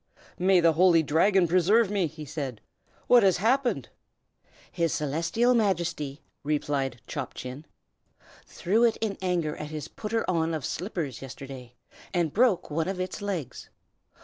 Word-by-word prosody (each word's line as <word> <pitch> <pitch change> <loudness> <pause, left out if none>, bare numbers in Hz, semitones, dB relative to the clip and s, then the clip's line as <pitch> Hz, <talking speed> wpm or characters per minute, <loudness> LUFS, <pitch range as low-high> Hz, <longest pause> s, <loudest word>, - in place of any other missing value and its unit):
"May 185 0 +4
the 165 -1 +4
Holy 170 0 +5
Dragon 175 +5 +3
preserve 190 +5 +3
me!" 195 -5 +1
he 155 0 -9
said. 135 -6 -5 0.5
"What 245 -1 +6
has 190 -4 +4
happened?" 235 - +1 0.8
"His 170 -3 0
Celestial 165 - +1
Majesty," 170 - -1 0.2
replied 140 -4 -1
Chop - - -5
Chin, 130 +4 -7 0.8
"threw 215 +7 +1
it 230 -2 +3
in 215 -3 -2
anger 175 -5 -1
at 150 - -6
his 155 -1 -6
Putter 225 +1 -3
on 165 -2 0
of 150 - -4
Slippers 165 - -4
yesterday, 130 -2 -9 0.4
and 170 -4 +1
broke 220 -8 +2
one 160 +2 -1
of 190 -1 -3
its 185 +2 -4
legs. 175 -11 -5
170 Hz, 145 wpm, -27 LUFS, 150-195 Hz, 0.8 s, What